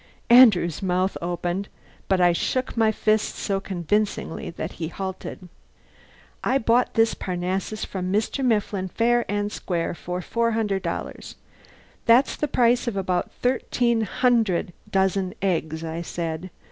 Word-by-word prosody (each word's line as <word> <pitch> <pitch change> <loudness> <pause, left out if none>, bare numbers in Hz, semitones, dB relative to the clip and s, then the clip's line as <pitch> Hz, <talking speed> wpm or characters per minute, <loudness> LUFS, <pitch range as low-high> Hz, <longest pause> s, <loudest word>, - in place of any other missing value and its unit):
Andrew's 210 - +6
mouth 185 0 0
opened, 175 +3 -2 0.4
but 190 -1 +2
I 175 -1 +5
shook 255 +8 -1
my 225 -2 +3
fist 215 0 +1
so 195 -2 -1
convincingly 195 +1 -2
that 165 - -5
he 160 - -5
halted. 190 +1 -6 1.0
"I 265 - +2
bought 240 0 +2
this 225 -1 +4
Parnassus 185 +4 -3
from 185 -1 -4
Mr. 220 +7 0
Mifflin 210 -5 0
fair 240 +5 +1
and 205 0 -1
square 170 -5 -2
for 180 +1 -5
four 230 +3 0
hundred 210 -4 0
dollars. - - -5 0.7
That's 240 +4 +5
the 300 - -1
price 245 -2 +2
of 220 -4 -2
about 185 -2 -1
thirteen 245 -2 +1
hundred 220 -5 +1 0.2
dozen 190 -1 +1
eggs," 160 -4 -1
I 165 +1 -4
said. 170 +1 -4
195 Hz, 135 wpm, -24 LUFS, 180-230 Hz, 1.0 s, Andrew's